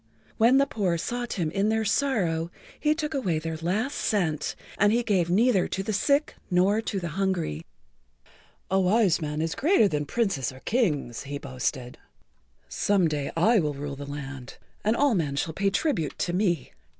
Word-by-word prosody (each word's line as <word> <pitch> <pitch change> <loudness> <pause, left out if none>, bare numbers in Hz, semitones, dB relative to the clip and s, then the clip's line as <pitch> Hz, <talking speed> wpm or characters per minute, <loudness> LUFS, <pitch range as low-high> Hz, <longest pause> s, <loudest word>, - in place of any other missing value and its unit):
When 235 +4 +5
the 275 - +5
poor 195 -10 -1
sought 240 +7 -3
him 165 -5 -1
in 195 +4 +1
their 220 0 +1
sorrow 195 - 0 0.3
he 305 0 +2
took 310 -1 -3
away 195 - 0
their 160 +1 -4
last 200 - -1
cent, 160 -9 0 0.2
and 205 +1 +5
he 240 +2 +2
gave 185 -6 +1
neither 205 +1 +3
to 195 - -3
the 215 - -2
sick 280 +8 +2 0.2
nor 190 +4 +3
to 205 -3 -3
the 175 -2 -4
hungry. 185 - -1
[Pg 80 - -11 1.1
51]"A 190 0 +3
wise 190 -2 +3
man 150 0 -2
is 165 - -1
greater 305 - +4
than 150 -5 -2
Princes 195 - 0
or 130 0 -13
Kings," 155 - 0
he 140 +1 -4
boasted. 130 -2 -4 0.7
"Some 195 -4 +2
day 150 -3 -2
I 220 +7 +4
will 150 -4 -1
rule 140 0 -5
the 140 +1 -8
land 135 -3 -7 0.3
and 215 +2 +2
all 285 -1 +3
men 150 -8 0
shall 160 +3 -2
pay 195 +4 +1
tribute 195 - -1
to 175 - -1
me." 180 -3 0
185 Hz, 185 wpm, -26 LUFS, 155-220 Hz, 1.1 s, When